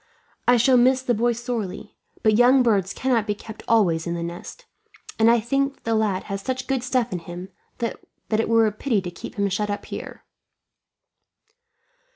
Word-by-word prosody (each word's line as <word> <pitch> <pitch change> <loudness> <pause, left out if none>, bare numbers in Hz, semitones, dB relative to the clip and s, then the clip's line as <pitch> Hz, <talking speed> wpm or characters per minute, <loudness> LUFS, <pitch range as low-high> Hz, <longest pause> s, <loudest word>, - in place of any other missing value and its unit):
I 245 0 +6
shall 250 +2 +4
miss 255 +2 +4
the 245 - +1
boy 240 +2 +1
sorely; 235 -5 -5 0.3
but 215 -1 +4
young 250 +3 +5
birds 200 -5 +2
cannot 240 -4 0
be 210 - 0
kept 220 +1 -10
always 175 -8 +2
in 170 - -2
the 170 - -3
nest, 175 - -8 0.5
and 225 +1 +6
I 235 0 +5
think 275 +4 0
that - - -33
the 230 - 0
lad 215 -4 0
has 200 0 -5
such 260 +3 -3
good 265 -2 -1
stuff 250 -3 0
in 180 - -2
him 175 +2 -8 0.3
that 230 - -3 0.3
it 220 +1 +1
were 230 -1 +5
a 215 - +1
pity 220 +1 0
to 180 -2 -6
keep - - -9
him 200 -1 +1
shut 205 +2 -1
up 205 - -4
here." - - -8
225 Hz, 190 wpm, -23 LUFS, 200-245 Hz, 0.5 s, I